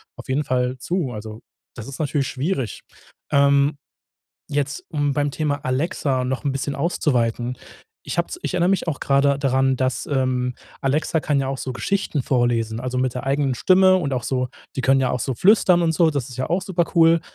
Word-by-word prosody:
auf - - -12
jeden 140 +3 +1
Fall 125 -1 -1
zu. 170 0 -2
Also, 110 0 -8 0.3
das 115 - -8
ist 140 - -8
natürlich 145 -3 0
schwierig. 135 - -3 0.5
Ähm, 140 +1 +4 0.7
jetzt, 140 -1 -2
um 145 -2 0
beim 145 +1 0
Thema 145 -1 -2
Alexa 130 -1 0
noch 130 +2 -2
'n 140 - 0
bisschen 140 +1 -3
auszuweiten. 125 -6 0 0.5
Ich - - -5
habe - - +1
es 360 - -7
ich - - -3
erinnere 175 0 +2
mich 190 -2 0
auch 150 -5 -2
grade 140 0 +2
daran, 135 -1 +2
dass, 130 0 -1
ähm, 130 -2 0 0.3
Alexa 150 +4 +1
kann 145 -2 0
ja 135 - -1
auch 135 0 -3
so 130 - -4
Geschichten 145 - -1
vorlesen, 120 -3 0
also 125 +1 -3
mit 130 -1 0
der 125 - -5
eigenen 135 -1 +1
Stimme 185 +6 +5
und 165 -7 -1
auch 125 -2 -2
so 125 0 -1 0.3
die 130 - -1
können 135 +2 +4
ja 130 - +1
auch 125 - -1
so 130 +1 -2
flüstern 180 - +4
und 165 - +2
so, 165 0 +3
das 140 -5 -2
ist 125 - -10
ja 130 - -2
auch 175 +2 0
supercool. 170 -3 +3
135 Hz, 200 wpm, -22 LUFS, 130-155 Hz, 0.7 s, Stimme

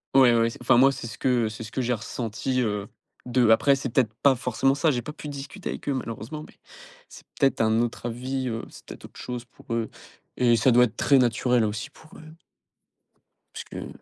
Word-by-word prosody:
Ouais 125 -3 +7
ouais, 115 0 +2
c'est 135 - -12
enfin 120 0 +4
moi 135 +2 +6
c'est 120 - -6
ce 115 - -9
que 120 -4 +1
c'est 110 +1 -8
ce 110 - -9
que 130 - -2
j'ai 125 0 -1
ressenti, 115 +3 -3
heu, 105 -3 -2 0.4
d'eux. 125 -2 +2
Après 135 +5 +5
c'est 135 -1 -4
peut-être 115 -3 +1
pas 140 -2 +5
forcément 135 +2 +1
ça, 155 +2 +2
j'ai 120 -2 -1
pas 150 - -7
pu 150 - -9
discuter 145 +7 -7
avec - - -5
eux - - +2
malheureusement 120 +5 -6
mais, - - -18 0.6
c'est - - -13 0.2
peut-être 135 -4 +2
un 110 +1 +3
autre 120 0 -3
avis, 130 +2 -3
heu, 115 -1 -3
c'est - - -15
peut-être - - -10
autre - - -14
chose 125 -1 -5
pour 115 - -9
eux 115 -1 -1 0.5
et 120 -2 +4
ça 115 +3 +3
doit 125 +1 +6
être 120 -2 -1
très 140 - +4
naturel 120 -1 +2
aussi 110 +6 -4
pour 155 +1 -18
eux 155 0 -13 1.2
puisque - - -7
125 Hz, 220 wpm, -25 LUFS, 115-135 Hz, 1.2 s, Ouais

